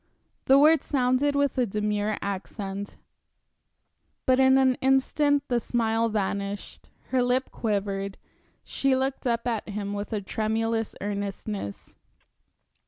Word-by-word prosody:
The 270 - +6
words 305 +1 +5
sounded 265 +1 +2
with 280 -2 +1
a 245 - +2
demure 210 +1 -1
accent. 200 0 -5 1.3
But 255 0 +4
in 265 0 +6
an 260 -1 +4
instant 280 +2 +3
the 245 -1 +1
smile 230 -1 0
vanished, 200 -1 -3 0.2
her 260 -1 +2
lip 250 +2 +1
quivered, 200 -2 -2 0.5
she 275 -1 +1
looked 265 0 -1
up 235 -1 0
at 225 -3 -2
him 205 0 -4
with 205 +2 -4
a 215 - 0
tremulous 225 +2 -1
earnestness. 200 - -5
225 Hz, 120 wpm, -26 LUFS, 205-260 Hz, 1.3 s, The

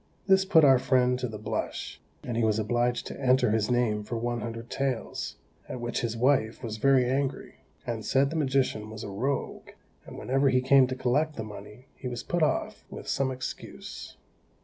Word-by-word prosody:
This 190 0 +4
put 165 -5 +6
our 135 -2 +6
friend 125 -1 +2
to 125 - -1
the 110 -2 -7
blush, 105 - -4 0.2
and 120 - -4
he 115 - +1
was 110 -1 +2
obliged 120 +3 0
to - - -7
enter 125 -3 +3
his 110 -1 +1
name 120 -4 +1
for 115 +3 -4
one 120 0 -2
hundred 115 +1 -6
taels, 135 -4 -2 0.3
at 125 - -5
which 120 0 -2
his 115 -1 -2
wife 125 -2 +2
was 110 -2 -4
very 135 +1 +4
angry, 135 +1 -2 0.3
and 115 -2 -3
said 135 +4 +2
the - - -4
magician 130 -7 0
was 110 0 -7
a - - -5
rogue, 130 +8 -3 0.4
and - - -9
whenever 135 +2 +2
he 130 -1 +3
came 135 0 +5
to 130 - -3
collect 145 +5 +1
the 110 - -4
money 105 +3 -10
he 130 - -7
was 125 -1 -4
put 175 - -1
off 150 -4 0
with - - -9
some 135 -1 +1
excuse. 130 -1 -7
125 Hz, 195 wpm, -28 LUFS, 115-135 Hz, 0.4 s, put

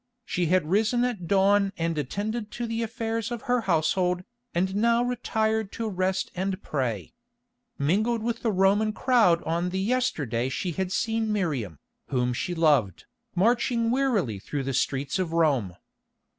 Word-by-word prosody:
She 180 -5 -1
had 180 -1 +2
risen 220 +7 +2
at 210 -9 -3
dawn 200 +1 +3
and 165 0 -1
attended 210 - -3
to 240 - -3
the 230 0 -2
affairs 225 0 -2
of 240 -2 -5
her 245 -1 +1
household, 180 0 +1 0.3
and 185 +2 0
now 235 +3 +3
retired 220 -3 -1
to 230 - -3
rest 190 -1 -1
and 185 +1 -2
pray. 125 -8 -3 0.6
Mingled 215 +10 +1
with 235 0 -2
the 225 - +1
Roman 200 +3 +3
crowd 225 -10 +3
on 170 +2 -1
the 185 - -3
yesterday 160 - 0
she 175 +6 -2
had 185 +2 -3
seen 225 +1 0
Miriam, 140 - -2 0.3
whom 125 -2 0
she 175 +8 -3
loved, 145 - +2 0.3
marching 230 +3 +2
wearily 225 - +1
through 140 +7 -4
the 135 0 -2
streets 140 +7 -1
of 175 -3 -2
Rome. 140 - +2
190 Hz, 155 wpm, -26 LUFS, 160-225 Hz, 0.6 s, dawn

